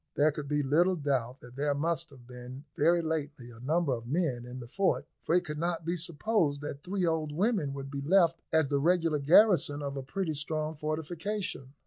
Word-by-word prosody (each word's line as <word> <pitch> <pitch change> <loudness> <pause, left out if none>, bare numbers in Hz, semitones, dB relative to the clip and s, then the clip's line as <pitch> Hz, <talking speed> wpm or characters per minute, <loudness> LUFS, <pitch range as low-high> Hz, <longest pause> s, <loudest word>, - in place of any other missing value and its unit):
There 150 +2 +4
could 145 -1 -6
be 145 0 +1
little 170 +7 +3
doubt 135 -4 -1
that 125 0 -13
there 145 +1 0
must 165 +2 -1
have 130 -4 -16
been 125 +3 -10
very 170 +3 +3
lately 145 -6 -3
a 115 - -13
number 150 +3 +1
of 115 -1 -5
men 135 -5 -1
in 125 +1 -7
the 120 - -7
fort, 190 +9 0
for 170 - 0
it 180 0 +2
could 150 -1 -5
not 170 -1 -2
be 170 +2 0
supposed 170 -2 0
that 145 -1 -6
three 185 +2 -1
old 160 -2 0
women 185 - +1
would 135 0 -6
be 140 -1 -4
left 170 +2 +3
as 160 -2 +3
the 140 -1 +1
regular 165 -1 +2
garrison 150 -1 +5
of 140 0 -4
a 135 - -3
pretty 160 +5 -3
strong 155 +1 -3
fortification. 155 0 -4
150 Hz, 205 wpm, -30 LUFS, 140-170 Hz, -, garrison